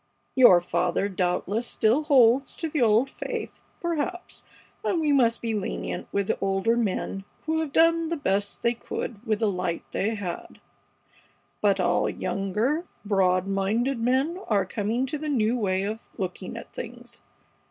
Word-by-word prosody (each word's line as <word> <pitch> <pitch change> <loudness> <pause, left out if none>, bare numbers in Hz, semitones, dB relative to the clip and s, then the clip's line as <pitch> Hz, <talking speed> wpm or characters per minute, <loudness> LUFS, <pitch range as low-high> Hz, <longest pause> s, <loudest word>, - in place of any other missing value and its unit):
Your 245 -9 +8
father 175 +2 0
doubtless 195 +4 -1
still 240 +8 +2
holds 265 -2 +4
to 330 - -3
the 300 -3 -1
old 225 +3 +4
faith, - - -6 0.2
perhaps, 345 +2 -3 0.4
and 350 - +1
we 305 -2 +2
must 235 -5 +3
be 225 -1 -1
lenient 205 -3 -3
with 200 0 0
the - - -1
older 195 +4 +1
men 195 -3 -1 0.2
who 320 0 0
have 315 -3 -2
done 330 +1 +3
the 335 - -1
best 200 -6 -1
they 235 - +3
could 225 -2 -6
with 215 -1 0
the 215 -2 +2
light 180 -2 -2
they 220 +3 0
had; 185 -5 -6 1.0
but 200 -2 +3
all 175 -1 +2
younger, 220 - -1 0.2
broad 185 -2 +2
minded 215 +7 0
men 265 +9 +1
are 200 -3 +2
coming 220 +6 -1
to 290 +3 -4
the 305 0 -3
new 235 -4 +2
way 190 -5 0
of 215 +3 -5
looking 185 -2 -5
at - - -10
things. - - -8
225 Hz, 160 wpm, -26 LUFS, 195-275 Hz, 1.0 s, Your